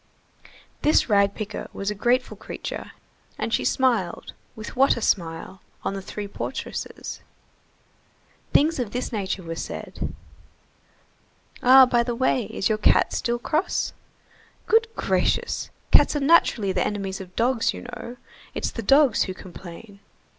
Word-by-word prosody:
This 300 -4 +3
rag 200 -1 +3
picker 210 -1 -5
was 200 +1 -2
a - - -1
grateful 245 +5 +1
creature, - - -7 0.5
and - - -3
she - - +2
smiled, 235 -10 0 0.2
with 215 -1 -8
what 270 0 +4
a - - -2
smile! 175 0 -1 0.2
on - - -1
the 195 - -4
three 205 +2 -6
portresses. 200 - -5 1.3
Things 310 0 +3
of 230 -5 -3
this 250 +1 -3
nature 195 -3 -3
were 165 0 -5
said:— 165 - -6 1.5
"Ah, 260 +1 +9
by 240 -1 +2
the 235 0 -2
way, 250 -1 +1
is 195 - -2
your 215 -1 0
cat - - +4
still 240 0 0
cross?" 310 +8 -1 0.7
"Good 450 +1 +4
gracious, 475 0 0 0.2
cats - - +6
are - - +1
naturally 275 - +4
the - - 0
enemies 195 -2 -3
of 185 -1 -12
dogs, 235 0 +2
you - - -8
know. 245 0 -8 0.4
It's - - -2
the 230 - -5
dogs 270 +3 +4
who 185 - -5
complain." 190 +3 -11
225 Hz, 145 wpm, -24 LUFS, 195-255 Hz, 1.5 s, Ah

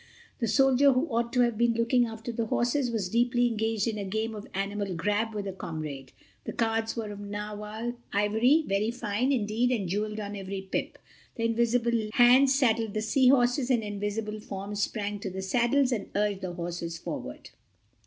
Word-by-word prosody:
The 230 - 0
soldier 270 +3 +5
who 255 +4 +1
ought 235 -1 0
to 250 - +3
have 235 -2 +1
been 235 -1 +3
looking 235 +1 +2
after 225 +1 -6
the 230 -1 -2
horses 245 +3 +1
was 220 -5 -1
deeply 240 +4 +2
engaged 225 -2 0
in 215 -2 -2
a - - -2
game 220 +3 -2
of 210 -1 -8
Animal 200 -1 -2
Grab 210 +6 -1
with 205 -1 -3
a 195 - -4
comrade. 150 -7 -6 0.3
The - - -4
cards 225 -1 0
were 220 -3 -4
of 205 - -8
narwhal 210 +3 -5 0.2
ivory, 220 +9 +3
very 200 +1 0
fine, 235 +2 -1
indeed, 230 -1 +1
and 210 -7 0
jeweled 210 +3 -2
on 205 -1 -5
every 195 0 -5
pip. 190 - -3 0.4
The 230 - -1
invisible 235 -1 +1
hands 260 +3 +6
saddled 225 -5 +1
the 215 - 0
Sea 255 +4 +3
Horses 250 0 +3
and 240 -4 +2
invisible 205 +1 -3
forms 200 0 -5
sprang 205 0 -2
to 200 - -4
the 190 +1 -5
saddles, 245 +6 +2
and 220 -5 -2
urged 205 -1 0
the 185 -2 -4
horses 170 -1 -4
forward. 60 - -7
220 Hz, 185 wpm, -28 LUFS, 205-240 Hz, 0.4 s, hands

